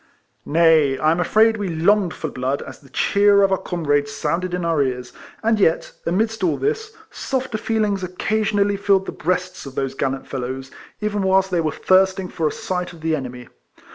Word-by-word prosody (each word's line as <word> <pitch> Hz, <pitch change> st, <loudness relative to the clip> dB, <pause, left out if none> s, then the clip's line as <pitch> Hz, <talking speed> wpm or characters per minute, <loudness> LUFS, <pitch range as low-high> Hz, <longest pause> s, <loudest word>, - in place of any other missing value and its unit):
Nay, 155 Hz, -4 st, +4 dB
I 155 Hz, +3 st, +2 dB
am 165 Hz, -, 0 dB
afraid 220 Hz, +5 st, +3 dB
we 205 Hz, -2 st, -3 dB
longed 175 Hz, +3 st, +2 dB
for -, -, -5 dB
blood 130 Hz, +2 st, -2 dB
as -, -, -10 dB
the 140 Hz, -, -19 dB
cheer 200 Hz, +6 st, +3 dB
of 195 Hz, -, +3 dB
our 190 Hz, -, +3 dB
comrades 145 Hz, -4 st, -1 dB
sounded 175 Hz, +5 st, -2 dB
in 180 Hz, -1 st, -3 dB
our 165 Hz, -3 st, +2 dB
ears; 125 Hz, -2 st, -2 dB, 0.3 s
and 220 Hz, -1 st, +2 dB
yet, 165 Hz, -4 st, +2 dB, 0.2 s
amidst 220 Hz, +4 st, 0 dB
all 175 Hz, -, +2 dB
this, 440 Hz, 0 st, -2 dB, 0.2 s
softer 260 Hz, -4 st, -3 dB
feelings 210 Hz, -4 st, 0 dB
oc 180 Hz, 0 st, -7 dB
cassionally 205 Hz, -2 st, +1 dB
filled 195 Hz, -1 st, +2 dB
the -, -, -4 dB
breasts 180 Hz, -1 st, -3 dB
of 135 Hz, -, -10 dB
those 135 Hz, -1 st, -2 dB
gallant 135 Hz, 0 st, -2 dB
fellows, 130 Hz, 0 st, -5 dB, 0.3 s
even 210 Hz, -1 st, -1 dB
whilst 190 Hz, 0 st, +2 dB
they 175 Hz, -2 st, +2 dB
were 155 Hz, -1 st, 0 dB
thirsting 190 Hz, +1 st, +2 dB
for 160 Hz, -2 st, -1 dB
a -, -, -1 dB
sight 180 Hz, -1 st, -4 dB
of 165 Hz, -, -14 dB
the 160 Hz, 0 st, +1 dB
enemy. 125 Hz, -3 st, -7 dB
180 Hz, 195 wpm, -21 LUFS, 150-200 Hz, 0.3 s, Nay